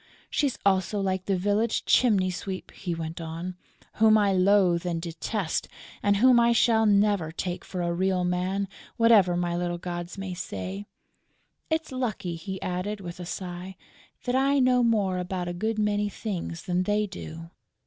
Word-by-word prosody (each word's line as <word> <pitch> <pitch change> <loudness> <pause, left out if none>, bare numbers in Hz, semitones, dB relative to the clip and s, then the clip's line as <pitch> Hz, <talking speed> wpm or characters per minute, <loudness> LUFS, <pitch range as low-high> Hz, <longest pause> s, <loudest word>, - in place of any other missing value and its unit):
"She's 285 -4 0
also 195 +1 +2
like 190 -1 -1
the 195 -2 +1
village 205 +4 0
chimney 200 -7 +4
sweep," 185 +1 -6
he 175 -3 -4
went 165 +1 -5
on, 165 +3 -5 0.5
"whom 220 -1 +7
I 200 -2 +3
loathe 185 -2 +4
and 175 -2 -2
detest 170 +2 -3 0.3
and 205 0 +3
whom 250 +2 +6
I 235 0 +4
shall 225 -1 +4
never 200 -5 +3
take 175 +1 -4
for 180 -2 -4
a 170 0 0
real 185 +1 +1
man, 180 +2 -1 0.3
whatever 215 -7 +5
my 175 -1 -1
little 175 0 -1
gods 175 +1 -5
may 195 -1 -4
say.... 190 +2 -5 0.8
It's 320 -2 -1
lucky," 230 -9 -2
he 190 +3 -6
added, 185 +4 -3
with 175 -2 -8
a 175 - -6
sigh, 180 +1 -6 0.5
"that 245 - -1
I 275 +2 +3
know 255 -1 +4
more 205 -6 +2
about 180 0 -3
a 175 - -3
good 220 +5 -2
many 210 -1 +1
things 185 -5 -5
than 180 -1 0
they 210 +3 +1
do!" 165 -4 -8
190 Hz, 170 wpm, -27 LUFS, 175-210 Hz, 0.8 s, whom